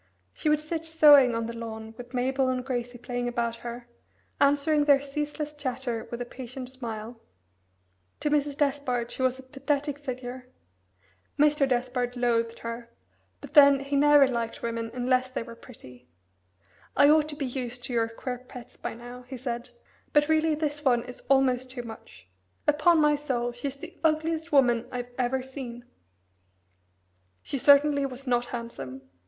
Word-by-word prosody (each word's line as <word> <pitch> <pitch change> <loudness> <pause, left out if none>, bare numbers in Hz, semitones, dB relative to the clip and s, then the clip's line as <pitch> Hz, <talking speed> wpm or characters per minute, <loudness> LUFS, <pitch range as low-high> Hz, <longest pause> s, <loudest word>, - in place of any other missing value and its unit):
She 305 - -1
would 300 0 +3
sit 320 +1 -4
sewing 295 -6 +6
on 230 0 -1
the 230 - -5
lawn 220 -1 -7
with 245 +1 -10
Mabel 260 +1 +1
and 255 -1 -2
Gracie 245 -2 -3
playing 245 0 -3
about 235 -1 -1
her, 240 +1 -8 0.5
answering 290 +1 +3
their 285 -2 +6
ceaseless 295 +2 -4
chatter 255 -5 -4
with 235 - -5
a - - -11
patient 255 +1 -8
smile. 230 -2 -7 1.0
To 295 - 0
Mrs. 290 -1 +1
Despard 270 -5 0
she - - -6
was 260 0 +2
a 265 - -11
pathetic 280 +2 -2
figure. 255 -2 -6 0.9
Mr. 295 -1 +3
Despard 245 0 -1
loathed 230 -1 +1
her, 230 0 -5 0.5
but - - -11
then 280 -2 +8
he 280 +1 -3
never 290 -1 +6
liked 235 -3 -3
women 230 -1 -2
unless 255 +1 +1
they 255 - -4
were 235 0 -10
pretty. 125 - -15 0.9
"I 285 - +7
ought 305 0 +4
to 295 - -4
be 285 -2 -3
used 245 -1 -5
to 245 - -5
your 230 -1 +2
queer 245 +2 -5
pets 250 -1 -12
by - - -5
now," 245 +1 -10
he 260 0 -7
said; 240 -1 -4 0.4
"but 295 0 +4
really 315 0 +2
this 295 -1 -3
one 245 -4 +3
is 250 0 -10
almost 260 -2 +3
too 255 -1 -6
much. 220 - -12 0.4
Upon 305 +3 +4
my 300 -1 +4
soul, 255 -5 -2
she's 260 +3 -5
the 345 +5 -10
ugliest 320 +1 0
woman 245 -5 +3
I've 245 0 -5
ever 255 +1 0
seen." 255 -3 -8 1.6
She 275 - -2
certainty 285 +1 +5
was 265 +1 -7
not 245 -1 +1
handsome. 230 - -7
255 Hz, 165 wpm, -27 LUFS, 240-285 Hz, 1.6 s, then